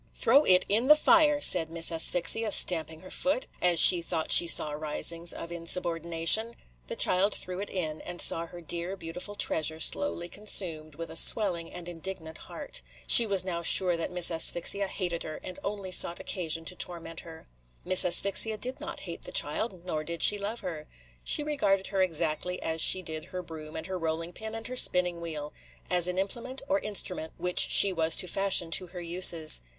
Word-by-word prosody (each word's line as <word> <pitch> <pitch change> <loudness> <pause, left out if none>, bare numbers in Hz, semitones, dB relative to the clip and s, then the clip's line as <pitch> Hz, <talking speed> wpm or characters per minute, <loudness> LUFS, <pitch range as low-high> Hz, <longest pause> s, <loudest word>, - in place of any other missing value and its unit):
"Throw 275 +6 +3
it 180 -1 +5
in 225 +5 +1
the 300 - +8
fire," 305 -1 +3
said 170 - +4
Miss 165 0 -1
Asphyxia, 180 +6 +1
stamping 160 -4 +2
her 185 - -14
foot, 270 -1 -2 0.2
as 175 -2 +4
she 175 0 +7
thought 165 -1 -4
she 170 - +7
saw 155 -2 +3
risings 155 +3 -3
of 170 - -8
insubordination. 170 +5 0 0.3
The - - -6
child 195 +3 +2
threw 180 0 -5
it 205 - -6
in, 160 -5 -5
and 175 0 -9
saw 165 0 +1
her 175 +1 -12
dear, 170 +3 -4
beautiful 180 +4 -9
treasure 160 -5 -1
slowly 175 - 0
consumed, 170 -6 -1
with 165 +2 -8
a - - -9
swelling 175 -3 +2
and 175 -1 -9
indignant 165 -2 -7
heart. - - -7 0.2
She 235 - +8
was 195 -2 +1
now 170 -2 -4
sure 175 +1 +3
that 165 - -5
Miss 180 -1 +1
Asphyxia 175 +4 +2
hated 175 -3 -5
her, 155 - -8
and 185 +1 -9
only 200 -2 -6
sought 170 -1 +2
occasion 165 -3 -5
to 180 - -5
torment 165 -2 -5
her. 160 -1 -13 0.4
Miss 185 0 0
Asphyxia 200 +4 +2
did 255 +6 -4
not 330 +3 -7
hate 170 -3 -9
the - - -8
child, 180 +4 -3
nor 155 -4 -4
did 170 +1 -4
she 210 - +5
love 210 +4 -5
her. 155 -4 -8 0.4
She 295 - +1
regarded 205 -11 -1
her 195 -1 -1
exactly 170 0 -1
as 160 0 -3
she 185 - +5
did 160 -2 -7
her 180 0 -8
broom 155 -2 -11
and 160 - -6
her 190 -1 -6
rolling 165 +1 -5
pin 220 +3 -7
and 225 0 -8
her 255 0 -5
spinning 180 -5 +3
wheel, 150 -3 -7 0.2
– - - -30
as 180 -1 +4
an 180 0 -4
implement 235 +8 -5
or 290 +1 0
instrument 190 - -5
which 180 +1 -3
she 195 -1 +4
was 160 -2 +1
to - - -1
fashion 195 -3 +1
to 185 +2 0
her 175 0 -9
uses. 170 - +4
175 Hz, 195 wpm, -27 LUFS, 165-195 Hz, 0.4 s, the